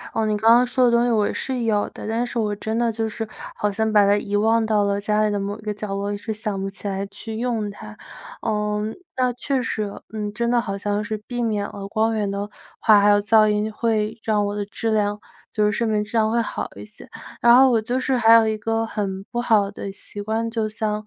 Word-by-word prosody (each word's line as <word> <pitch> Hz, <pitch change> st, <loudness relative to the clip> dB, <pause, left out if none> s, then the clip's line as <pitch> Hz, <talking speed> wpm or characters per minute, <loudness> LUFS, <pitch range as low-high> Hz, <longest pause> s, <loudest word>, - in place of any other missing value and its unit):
呃， 220 Hz, -, +1 dB
你 215 Hz, -1 st, +1 dB
刚 220 Hz, +2 st, +3 dB
刚 245 Hz, +1 st, +4 dB
说 250 Hz, +1 st, +1 dB
的 245 Hz, -, +6 dB
东 235 Hz, 0 st, +3 dB
西 245 Hz, -, +1 dB
我 210 Hz, -2 st, +2 dB
是 260 Hz, -2 st, -3 dB
有 215 Hz, -3 st, +1 dB
的， -, -, -8 dB
但 230 Hz, +2 st, 0 dB
是 240 Hz, -1 st, -3 dB
我 210 Hz, -2 st, 0 dB
真 220 Hz, +2 st, -4 dB
的 235 Hz, 0 st, +1 dB
就 225 Hz, 0 st, -2 dB
是， 220 Hz, 0 st, -5 dB, 0.3 s
好 210 Hz, -, -1 dB
像 220 Hz, +2 st, 0 dB
把 210 Hz, -1 st, +6 dB
它 205 Hz, +1 st, +4 dB
遗 205 Hz, 0 st, -3 dB
忘 225 Hz, +2 st, +3 dB
到 215 Hz, -1 st, +2 dB
了 200 Hz, 0 st, 0 dB
家 210 Hz, +1 st, +1 dB
里 215 Hz, -, +2 dB
的 205 Hz, -1 st, -1 dB
某 200 Hz, +2 st, -4 dB
一 -, -, -12 dB
个 215 Hz, -, -3 dB
角 210 Hz, 0 st, -6 dB
落， 200 Hz, +1 st, -2 dB
一 205 Hz, -, -3 dB
直 220 Hz, +2 st, -4 dB
想 210 Hz, -2 st, -3 dB
不 195 Hz, 0 st, -3 dB
起 200 Hz, +1 st, -7 dB
来 195 Hz, 0 st, -2 dB
去 210 Hz, +3 st, -8 dB
用 230 Hz, -3 st, -1 dB
它。 215 Hz, +1 st, -10 dB, 0.5 s
呃， 210 Hz, -1 st, -1 dB, 0.4 s
那 255 Hz, -1 st, +2 dB
确 260 Hz, +2 st, -1 dB
实， 220 Hz, -2 st, -2 dB
呃， 200 Hz, -1 st, -7 dB, 0.3 s
真 235 Hz, +2 st, -1 dB
的 245 Hz, -, +3 dB
好 210 Hz, -4 st, -3 dB
像 205 Hz, +1 st, -2 dB
是 215 Hz, 0 st, -4 dB
避 245 Hz, -1 st, -2 dB
免 210 Hz, -3 st, -1 dB
了， 200 Hz, -1 st, -8 dB
光 220 Hz, +2 st, 0 dB
源 210 Hz, -2 st, -1 dB
的 200 Hz, +1 st, -4 dB, 0.3 s
话， 215 Hz, -2 st, +6 dB
还 205 Hz, -, +4 dB
有 205 Hz, -, +4 dB
噪 215 Hz, +1 st, +5 dB
音， 210 Hz, +1 st, 0 dB
会 220 Hz, 0 st, -1 dB
让 210 Hz, -2 st, +1 dB
我 205 Hz, -, -3 dB
的 205 Hz, -1 st, -2 dB
质 225 Hz, +3 st, -3 dB
量 205 Hz, -1 st, 0 dB, 0.3 s
就 215 Hz, -, +1 dB
是 210 Hz, -, +3 dB
睡 230 Hz, +3 st, -1 dB
眠 210 Hz, -1 st, +1 dB
质 210 Hz, -, -13 dB
量 215 Hz, -1 st, +3 dB
会 235 Hz, +1 st, +2 dB
好 230 Hz, -, -4 dB
一 -, -, -9 dB
些。 210 Hz, 0 st, -14 dB, 0.3 s
然 235 Hz, 0 st, +7 dB
后 265 Hz, +1 st, +7 dB
我 230 Hz, -, +3 dB
就 240 Hz, +4 st, -2 dB
是 265 Hz, 0 st, 0 dB
还 225 Hz, -1 st, +6 dB
有 225 Hz, -1 st, +6 dB
一 220 Hz, 0 st, -1 dB
个 225 Hz, +1 st, -1 dB
很 195 Hz, -3 st, -3 dB
不 240 Hz, -, -4 dB
好 215 Hz, -4 st, +3 dB
的 200 Hz, -, -6 dB
习 205 Hz, +1 st, -9 dB
惯， 220 Hz, +2 st, -1 dB
就 225 Hz, -1 st, -1 dB
像， 215 Hz, -1 st, -3 dB
215 Hz, 280 characters per minute, -22 LUFS, 205-225 Hz, 0.5 s, 然